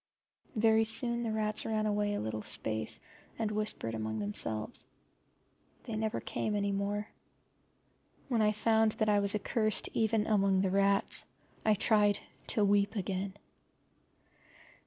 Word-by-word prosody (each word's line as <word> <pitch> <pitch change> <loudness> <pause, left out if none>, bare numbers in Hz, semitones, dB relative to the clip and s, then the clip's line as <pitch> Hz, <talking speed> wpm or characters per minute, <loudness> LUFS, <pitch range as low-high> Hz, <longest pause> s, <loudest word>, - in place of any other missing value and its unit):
Very 220 0 +3
soon 235 +1 +5
the 230 -2 -2
rats 215 -1 -1
ran 215 -1 -1
away 205 -1 0
a - - -2
little 110 0 -4
space 110 +1 -2 0.4
and 220 -2 -2
whispered 210 - -3
among 110 0 -4
themselves. 110 - -2 1.0
They 230 -4 -6
never 220 +1 -2
came 210 - -3
any 200 -1 -1
more. 200 +1 -2 1.2
When 240 -5 0
I 210 0 +3
found 220 0 +2
that 215 - -1
I 205 -1 +3
was 200 0 +4
accursed 215 0 0
even 220 -1 +1
among 195 -3 +2
the 190 -1 0
rats 200 0 +4 0.4
I 215 -1 +3
tried 205 -1 +2 0.3
to 215 -4 +2
weep 205 +1 +2
again. 190 -1 -3
210 Hz, 135 wpm, -31 LUFS, 195-220 Hz, 1.2 s, soon